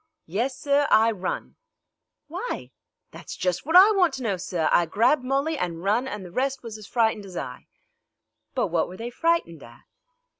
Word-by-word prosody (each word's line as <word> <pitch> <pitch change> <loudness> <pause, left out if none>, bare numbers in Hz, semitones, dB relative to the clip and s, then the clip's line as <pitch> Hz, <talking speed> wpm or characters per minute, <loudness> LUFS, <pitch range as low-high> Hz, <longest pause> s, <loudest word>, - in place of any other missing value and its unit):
"Yes, 240 +10 -2
sir; 285 0 +2
I 225 +1 +5
run." 190 -4 -5 0.7
"Why?" 365 +11 -5 0.4
"That's - - -9
just 180 +7 -2
what 325 - 0
I 385 +4 +9
want 370 -5 +2
to 265 - -6
know, 205 -4 0
sir. 175 -3 -2
I 175 - +4
grabbed 235 - +2
Molly 275 +4 -1
an' 170 -2 -2
run, 215 +7 +1
an' 210 -6 -5
the 180 - -10
rest 265 +6 -1
was 230 -2 -7
as 210 - -11
frightened 220 -4 0
as 180 -2 -9
I." 125 - -7 0.9
"But - - 0
what 165 -1 +1
were 185 - -10
they 235 +2 -6
frightened 330 - 0
at?" 120 0 -15
225 Hz, 185 wpm, -25 LUFS, 180-275 Hz, 0.9 s, I